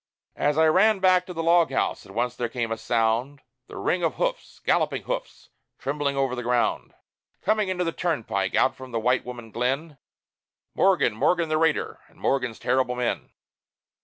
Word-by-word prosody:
As 145 +1 +1
I 160 - +5
ran 195 +7 +4
back 185 -1 +3
to 180 - -6
the 165 -1 -3
log 170 -2 +4
house, 135 - -1
at - - -12
once 120 +3 -1
there 120 -1 -2
came 115 -2 -3
a - - +1
sound 115 +4 0 0.2
The - - -10
ring 180 - 0
of 165 - 0
hoofs, - - -3
galloping - - +1
hoofs, - - -5 0.3
trembling 140 0 -2
over 135 -2 +1
the 125 - -4
ground 120 0 0 0.5
Coming 215 -2 +1
into 180 -1 0
the 165 - -1
turnpike, 110 - -1
out 130 - +3
from 130 0 -10
the 115 - -1
White 125 +3 +2
Woman 120 -3 -8
Glen 135 +5 -2 0.7
Morgan, 185 - +3
Morgan 170 +9 +1
the 155 - +2
raider, 160 -1 0
and - - -24
Morgan's 125 -4 0
terrible 130 -1 0
men. 125 -1 -2
135 Hz, 180 wpm, -25 LUFS, 120-170 Hz, 0.7 s, I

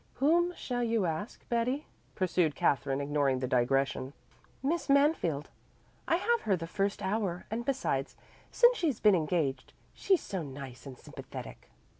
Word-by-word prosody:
"Whom 345 +5 +3
shall 245 -1 -3
you 230 -4 +1
ask, 175 +7 -4
Betty?" 245 +5 0 0.3
pursued 180 -5 +1
Katherine, 135 +1 +1
ignoring 140 -2 +1
the 130 0 -2
digression. 130 +2 +1 0.5
"Miss 320 +3 -1
Mansfield. 275 - +2 0.6
I 330 - +3
have 470 +6 +1
her 200 - +2
the 165 -2 -5
first 195 +4 -2
hour, 190 -3 -1
and 230 +2 -2
besides, 240 - -1 0.3
since 485 +1 +5
she's 305 -9 0
been 210 -1 +5
engaged 155 -6 0 0.2
she's 380 -3 +2
so 190 -3 -4
nice 135 -3 -8
and 130 -2 -9
sympathetic." - - -10
185 Hz, 145 wpm, -31 LUFS, -, 0.6 s, since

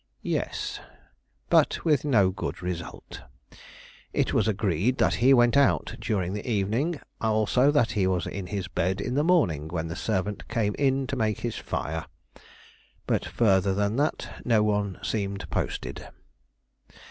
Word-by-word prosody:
"Yes; - - -2 0.7
but - - +3
with 150 -4 +3
no 105 -10 +3
good 90 -1 -5
result. 90 -5 -6 0.9
It - - +1
was - - +2
agreed 105 - 0
he 130 +3 +3
went 120 -1 +5
out 140 -1 +3
during 95 -5 -1
the 105 +4 -5
evening; 115 - 0 0.2
also 110 +4 +3
that 145 -6 +3
he 95 -3 +1
was 90 -3 0
in 95 -2 -5
his 95 -1 -3
bed 95 +1 -1
in 125 +5 -2
the 145 +3 +2
morning 90 - +2
when 80 0 -3
the 80 - -4
servant 100 +2 -2
came 105 -3 0
in 135 -1 +2
to 135 - -3
make 110 -4 -1
his 120 -2 -3
fire; 80 +2 -4 1.0
but - - 0
further 95 -4 +2
than 105 +3 0
this 145 +2 0 0.2
no 115 -3 +3
one 105 -2 0
seemed 100 -2 -2
posted." - - -3
105 Hz, 145 wpm, -26 LUFS, 95-125 Hz, 1.0 s, went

